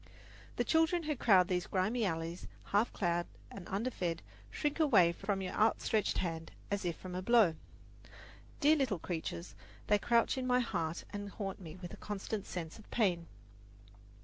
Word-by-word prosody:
The -, -, +1 dB
children 325 Hz, +2 st, +3 dB
who 300 Hz, -1 st, -1 dB
crowd 195 Hz, -7 st, +5 dB
these 180 Hz, -2 st, -1 dB
grimy 210 Hz, +5 st, +1 dB
alleys, 165 Hz, 0 st, -3 dB, 0.2 s
half 205 Hz, +4 st, +1 dB
clad 175 Hz, -3 st, 0 dB, 0.2 s
and 195 Hz, -3 st, -9 dB
underfed, 190 Hz, -5 st, -2 dB, 0.3 s
shrink 295 Hz, +1 st, -2 dB
away 215 Hz, -, +6 dB
from 195 Hz, +2 st, -2 dB
your 185 Hz, -, -4 dB
outstretched 215 Hz, -1 st, +2 dB
hand 165 Hz, -2 st, -2 dB, 0.2 s
as 200 Hz, -2 st, -1 dB
if 170 Hz, -2 st, -1 dB
from 185 Hz, -1 st, -8 dB
a 180 Hz, -, -2 dB
blow. 220 Hz, -4 st, +5 dB, 1.1 s
Dear 310 Hz, +1 st, +5 dB
little 255 Hz, -9 st, +1 dB
creatures, 105 Hz, -, -4 dB, 0.3 s
they 210 Hz, 0 st, +3 dB
crouch 235 Hz, +4 st, +2 dB
in 255 Hz, -, -2 dB
my 250 Hz, 0 st, +4 dB
heart 165 Hz, -9 st, -2 dB
and 205 Hz, 0 st, -5 dB
haunt 195 Hz, -1 st, -5 dB
me 160 Hz, -2 st, -8 dB
with 180 Hz, -2 st, -8 dB
a -, -, -8 dB
constant 205 Hz, 0 st, -4 dB
sense 165 Hz, +1 st, -5 dB
of 215 Hz, -, -16 dB
pain. 180 Hz, -7 st, +1 dB
195 Hz, 165 wpm, -34 LUFS, 175-230 Hz, 1.1 s, away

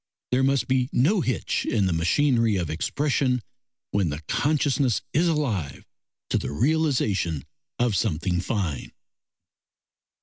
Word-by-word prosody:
There 125 Hz, +1 st, +3 dB
must 135 Hz, 0 st, +2 dB
be 130 Hz, -1 st, +1 dB
no 175 Hz, -, +3 dB
hitch 130 Hz, -, -1 dB
in 105 Hz, -4 st, +1 dB
the 95 Hz, -, +1 dB
machinery 115 Hz, -, +2 dB
of 85 Hz, -5 st, -2 dB
expression 130 Hz, -, 0 dB, 0.5 s
when 100 Hz, -5 st, +1 dB
the 75 Hz, 0 st, -4 dB
consciousness 140 Hz, -, +1 dB
is 170 Hz, +4 st, +3 dB
alive 115 Hz, -, -1 dB, 0.5 s
to -, -, +2 dB
the -, -, -4 dB
realisation 110 Hz, -, 0 dB, 0.3 s
of 120 Hz, -4 st, +1 dB
something 90 Hz, +1 st, 0 dB
fine. 90 Hz, -, -3 dB
120 Hz, 125 wpm, -25 LUFS, 90-140 Hz, 0.5 s, There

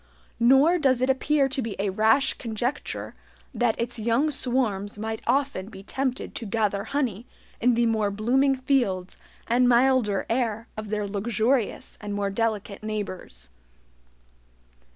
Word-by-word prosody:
Nor 270 Hz, +9 st, +5 dB
does 265 Hz, -5 st, +3 dB
it 255 Hz, +1 st, +3 dB
appear 275 Hz, +1 st, +2 dB
to 270 Hz, 0 st, -1 dB
be 225 Hz, -3 st, -4 dB
a 200 Hz, 0 st, -1 dB
rash 220 Hz, +7 st, +3 dB
conjecture 240 Hz, +5 st, -4 dB, 0.4 s
that 240 Hz, -2 st, +1 dB
its 235 Hz, 0 st, -3 dB
young 235 Hz, +7 st, +1 dB
swarms 230 Hz, -7 st, -1 dB
might 220 Hz, +1 st, -4 dB
often 265 Hz, -6 st, 0 dB
be 195 Hz, -3 st, -11 dB
tempted 260 Hz, +4 st, -3 dB
to 230 Hz, -, -6 dB
gather 200 Hz, -1 st, 0 dB
honey 245 Hz, -6 st, -2 dB, 0.3 s
in 245 Hz, 0 st, +3 dB
the 235 Hz, 0 st, +3 dB
more 220 Hz, -3 st, +1 dB
blooming 255 Hz, +7 st, +2 dB
fields 240 Hz, -9 st, 0 dB, 0.3 s
and 245 Hz, +1 st, +3 dB
milder 240 Hz, -5 st, +3 dB
air 230 Hz, -2 st, -1 dB
of 215 Hz, -1 st, -6 dB
their 210 Hz, -1 st, -1 dB
luxurious 220 Hz, +4 st, -1 dB
and 205 Hz, -1 st, -4 dB
more 200 Hz, -1 st, -1 dB
delicate 210 Hz, -1 st, -2 dB
neighbors. 185 Hz, -, -5 dB
230 Hz, 140 wpm, -25 LUFS, 210-260 Hz, 0.4 s, Nor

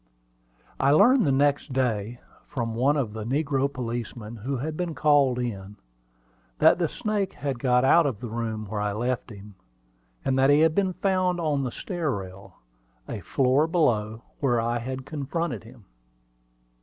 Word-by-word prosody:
I 135 Hz, -, +3 dB
learned 220 Hz, -, +5 dB
the -, -, +3 dB
next 140 Hz, 0 st, +1 dB
day, 120 Hz, -3 st, -1 dB, 0.3 s
from 115 Hz, -5 st, -3 dB
one 135 Hz, +6 st, +2 dB
of 120 Hz, -7 st, -2 dB
the 110 Hz, -1 st, -5 dB
negro 140 Hz, +2 st, 0 dB
policemen 120 Hz, -2 st, -5 dB
who 130 Hz, +6 st, -3 dB
had 155 Hz, +5 st, -4 dB
been 170 Hz, -1 st, -3 dB
called 145 Hz, -4 st, +3 dB
in, 105 Hz, -5 st, -4 dB, 0.8 s
that -, -, +5 dB
the -, -, +2 dB
snake 210 Hz, -3 st, -2 dB
had 140 Hz, -4 st, -4 dB
got 125 Hz, 0 st, +3 dB
out 165 Hz, +3 st, +5 dB
of 120 Hz, -7 st, -3 dB
the 120 Hz, -, -6 dB
room 110 Hz, -1 st, -4 dB
where 105 Hz, 0 st, -4 dB
I 105 Hz, -1 st, -1 dB
left 120 Hz, +4 st, -2 dB
him, 105 Hz, -1 st, -11 dB, 0.7 s
and 135 Hz, 0 st, +1 dB
that 135 Hz, +1 st, +4 dB
he 145 Hz, +1 st, +5 dB
had 160 Hz, -1 st, +4 dB
been 190 Hz, 0 st, +1 dB
found 185 Hz, -2 st, 0 dB
on 150 Hz, -4 st, 0 dB
the 130 Hz, -2 st, -3 dB
stair 175 Hz, -, -3 dB
rail, 95 Hz, -4 st, -6 dB, 0.5 s
a -, -, -5 dB
floor 135 Hz, +4 st, +2 dB
below 115 Hz, -10 st, 0 dB, 0.2 s
where 120 Hz, -4 st, +2 dB
I 120 Hz, +1 st, 0 dB
had 130 Hz, +2 st, -5 dB
confronted 145 Hz, -, -3 dB
him. 115 Hz, -2 st, -15 dB
130 Hz, 170 wpm, -26 LUFS, 115-150 Hz, 0.8 s, learned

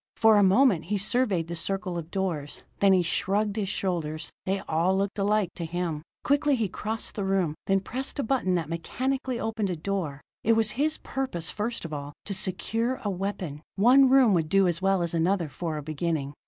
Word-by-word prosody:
For 220 Hz, -1 st, +6 dB
a -, -, +6 dB
moment 195 Hz, -, +4 dB
he 205 Hz, +4 st, -1 dB
surveyed 200 Hz, -4 st, +1 dB
the 170 Hz, -, -4 dB
circle 190 Hz, +1 st, -2 dB
of 170 Hz, -1 st, -5 dB
doors: 170 Hz, -7 st, -3 dB, 0.2 s
then 200 Hz, -1 st, +5 dB
he 185 Hz, -2 st, +4 dB
shrugged 200 Hz, +5 st, 0 dB
his 205 Hz, -4 st, -1 dB
shoulders. 165 Hz, -6 st, -2 dB, 0.2 s
They 195 Hz, +1 st, 0 dB
all 170 Hz, +4 st, +1 dB
looked 200 Hz, +1 st, -1 dB
alike 205 Hz, -1 st, +2 dB
to 175 Hz, -, -4 dB
him. 165 Hz, -2 st, -3 dB, 0.2 s
Quickly 285 Hz, 0 st, +3 dB
he 225 Hz, -4 st, 0 dB
crossed 215 Hz, +4 st, -4 dB
the 205 Hz, -, -3 dB
room, 190 Hz, -5 st, +1 dB
and 195 Hz, 0 st, +2 dB
pressed 265 Hz, +3 st, -4 dB
a 280 Hz, -, 0 dB
button 220 Hz, -7 st, +1 dB
that 165 Hz, -4 st, -1 dB
mechanically 255 Hz, -, -2 dB
opened 220 Hz, -3 st, -1 dB
a 180 Hz, -, -1 dB
door. 165 Hz, -5 st, -3 dB, 0.2 s
It 230 Hz, -, +4 dB
was 220 Hz, -1 st, +2 dB
his 305 Hz, +6 st, 0 dB
purpose, 260 Hz, -12 st, -2 dB
first 215 Hz, -1 st, -3 dB
of 160 Hz, -, -6 dB
all, 145 Hz, 0 st, -5 dB
to 200 Hz, -, -2 dB
secure 225 Hz, +7 st, -1 dB
a 205 Hz, -, -1 dB
weapon; 180 Hz, -6 st, -4 dB
one 255 Hz, +6 st, +6 dB
room 260 Hz, -5 st, +6 dB
would 160 Hz, -4 st, +1 dB
do 195 Hz, +1 st, +4 dB
as 170 Hz, 0 st, -1 dB
well 195 Hz, -2 st, +2 dB
as 170 Hz, -, -2 dB
another 170 Hz, 0 st, +1 dB
for 160 Hz, +1 st, -4 dB
a 150 Hz, -, -5 dB
beginning. 155 Hz, -2 st, -2 dB
195 Hz, 205 wpm, -27 LUFS, 170-220 Hz, 0.2 s, For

